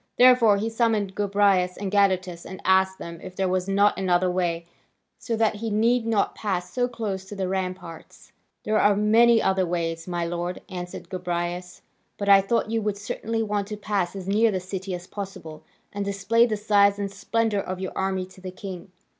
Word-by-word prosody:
Therefore 245 Hz, -4 st, +6 dB
he 210 Hz, +3 st, -2 dB
summoned 225 Hz, -4 st, 0 dB
Gobryas 200 Hz, -3 st, +2 dB
and 195 Hz, -1 st, -4 dB
Gadatas, 185 Hz, -4 st, +1 dB
and 190 Hz, -, -9 dB
asked 190 Hz, 0 st, +3 dB
them 170 Hz, -1 st, -8 dB
if 185 Hz, 0 st, -9 dB
there 190 Hz, 0 st, 0 dB
was 185 Hz, 0 st, -1 dB
not 200 Hz, +1 st, +3 dB
another 180 Hz, -1 st, +2 dB
way, 170 Hz, -2 st, -1 dB, 0.5 s
so 230 Hz, -, -2 dB
that 220 Hz, -1 st, +1 dB
he 225 Hz, +1 st, -3 dB
need 230 Hz, +3 st, +2 dB
not 220 Hz, -3 st, +1 dB
pass 185 Hz, -4 st, -3 dB
so 245 Hz, -1 st, +1 dB
close 215 Hz, -6 st, -4 dB
to 205 Hz, -, -9 dB
the 190 Hz, -2 st, -2 dB
ramparts. 185 Hz, -3 st, -6 dB, 0.3 s
"There 215 Hz, 0 st, +1 dB
are 205 Hz, 0 st, +4 dB
many 225 Hz, +3 st, +4 dB
other 190 Hz, 0 st, +2 dB
ways, 165 Hz, -1 st, -2 dB
my 175 Hz, -1 st, -2 dB
lord," 175 Hz, +1 st, -4 dB
answered 180 Hz, -2 st, -7 dB
Gobryas, 180 Hz, 0 st, -4 dB, 0.3 s
"but 200 Hz, -, -4 dB
I 200 Hz, -1 st, +8 dB
thought 220 Hz, +2 st, 0 dB
you 225 Hz, -1 st, 0 dB
would 210 Hz, -1 st, -2 dB
certainly 225 Hz, +2 st, -3 dB
want 205 Hz, -2 st, -2 dB
to 210 Hz, 0 st, -6 dB
pass 200 Hz, -3 st, -2 dB
as 190 Hz, -1 st, -7 dB
near 215 Hz, +3 st, +3 dB
the 190 Hz, -3 st, -1 dB
city 190 Hz, 0 st, -5 dB
as 175 Hz, 0 st, -8 dB
possible, 185 Hz, -6 st, -8 dB, 0.3 s
and 205 Hz, 0 st, -2 dB
display 200 Hz, +4 st, +2 dB
the 215 Hz, -2 st, -1 dB
size 205 Hz, -1 st, +3 dB
and 200 Hz, -1 st, -3 dB
splendour 225 Hz, 0 st, 0 dB
of 185 Hz, -1 st, -5 dB
your 185 Hz, -1 st, -4 dB
army 190 Hz, -1 st, -1 dB
to 185 Hz, 0 st, -17 dB
the 185 Hz, -, -6 dB
king. 185 Hz, 0 st, -8 dB
195 Hz, 195 wpm, -25 LUFS, 185-210 Hz, 0.5 s, I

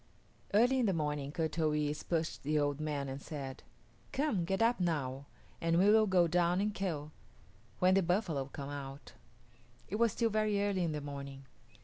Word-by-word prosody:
Early 245 Hz, +6 st, +4 dB
in 240 Hz, -, +2 dB
the 195 Hz, -, +2 dB
morning 150 Hz, -3 st, -2 dB
Kut 160 Hz, 0 st, -2 dB
o 155 Hz, -1 st, +3 dB
yis´ 150 Hz, 0 st, -1 dB
pushed 165 Hz, -2 st, -1 dB
the 150 Hz, +2 st, 0 dB
old 145 Hz, -1 st, +1 dB
man 150 Hz, -2 st, -2 dB
and 135 Hz, +1 st, -5 dB
said, 135 Hz, -4 st, -6 dB, 0.5 s
"Come, 260 Hz, -, 0 dB
get 190 Hz, +2 st, -1 dB
up 230 Hz, 0 st, +3 dB
now, 140 Hz, -6 st, -1 dB, 0.3 s
and 165 Hz, 0 st, +2 dB
we 195 Hz, +4 st, +6 dB
will 220 Hz, 0 st, +5 dB
go 180 Hz, -3 st, +4 dB
down 175 Hz, +1 st, +2 dB
and 210 Hz, +1 st, 0 dB
kill, 160 Hz, -7 st, -3 dB, 0.7 s
when 185 Hz, +1 st, +4 dB
the 195 Hz, -, +4 dB
buffalo 175 Hz, -6 st, 0 dB
come 140 Hz, +1 st, -7 dB
out." 140 Hz, 0 st, -7 dB, 0.8 s
It 210 Hz, -, -2 dB
was 230 Hz, -1 st, +3 dB
still 230 Hz, +2 st, 0 dB
very 215 Hz, -1 st, +1 dB
early 200 Hz, -2 st, +1 dB
in 165 Hz, -2 st, -1 dB
the 150 Hz, -, -3 dB
morning. 140 Hz, -1 st, -7 dB
165 Hz, 190 wpm, -33 LUFS, 145-195 Hz, 0.8 s, we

